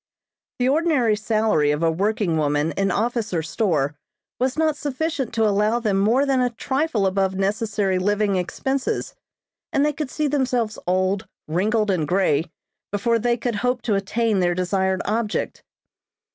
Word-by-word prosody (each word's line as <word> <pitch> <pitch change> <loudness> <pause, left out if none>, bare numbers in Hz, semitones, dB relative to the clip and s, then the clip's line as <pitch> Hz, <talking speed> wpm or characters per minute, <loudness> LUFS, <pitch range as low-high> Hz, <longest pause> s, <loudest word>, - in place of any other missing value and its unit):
The 250 - +1
ordinary 280 -6 +2
salary 215 -7 +1
of 150 +2 0
a 165 - +3
working 195 0 0
woman 150 0 +1
in 195 +2 0
office 220 0 -1
or 160 - 0
store 155 -5 0 0.5
was 255 +3 0
not 315 -1 +2
sufficient 295 -1 -2
to 225 -1 +3
allow 210 +3 +2
them 210 -4 0
more 235 +8 +3
than 270 -2 +2
a 250 - +2
trifle 265 -1 -1
above 190 0 +1
necessary 200 -1 0
living 205 +1 +1
expenses, 260 +9 -2 0.6
and 280 - +2
they 300 - +1
could 290 -1 -4
see 305 +1 -1
themselves 250 -6 0
old, 185 +2 0 0.2
wrinkled 210 +6 +1
and 165 -5 0
grey 170 -4 +2 0.5
before 230 +3 +1
they 240 +1 +1
could 235 -2 -2
hope 250 +2 -1
to 220 - 0
attain 205 +2 0
their 175 -1 +1
desired 190 +1 0
object. 215 0 -2
210 Hz, 160 wpm, -22 LUFS, 190-245 Hz, 0.6 s, a